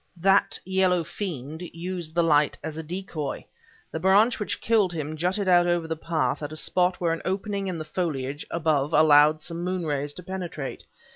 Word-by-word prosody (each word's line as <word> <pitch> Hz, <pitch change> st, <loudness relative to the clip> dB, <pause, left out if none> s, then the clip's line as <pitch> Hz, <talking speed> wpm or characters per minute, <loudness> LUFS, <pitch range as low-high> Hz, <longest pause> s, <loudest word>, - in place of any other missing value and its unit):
That 195 Hz, +3 st, +3 dB
yellow 185 Hz, -2 st, +2 dB
fiend 160 Hz, -4 st, -6 dB
used 175 Hz, -1 st, -6 dB
the 170 Hz, -, +3 dB
light 150 Hz, -2 st, +3 dB
as 155 Hz, 0 st, -5 dB
a 160 Hz, -, -4 dB
decoy. 165 Hz, -3 st, -5 dB, 0.5 s
The 160 Hz, -, -3 dB
branch 200 Hz, +7 st, +4 dB
which 210 Hz, -, -2 dB
killed 215 Hz, -5 st, +2 dB
him 155 Hz, -1 st, -4 dB
jutted 185 Hz, +5 st, -1 dB
out 175 Hz, -1 st, +5 dB
over 175 Hz, -2 st, +1 dB
the 160 Hz, -, -2 dB
path 160 Hz, 0 st, -1 dB
at 145 Hz, 0 st, -5 dB
a 155 Hz, -, -7 dB
spot 180 Hz, +2 st, 0 dB
where 170 Hz, -2 st, +1 dB
an 165 Hz, -, -4 dB
opening 195 Hz, +1 st, -2 dB
in 180 Hz, -2 st, -3 dB
the 155 Hz, -, -5 dB
foliage 145 Hz, -4 st, -3 dB
above 155 Hz, -2 st, 0 dB
allowed 155 Hz, 0 st, +6 dB
some 170 Hz, +2 st, -5 dB
moon 180 Hz, -1 st, -2 dB
rays 145 Hz, -1 st, -1 dB
to 180 Hz, -, -10 dB
penetrate. 175 Hz, -6 st, -6 dB
170 Hz, 190 wpm, -26 LUFS, 155-185 Hz, 0.5 s, allowed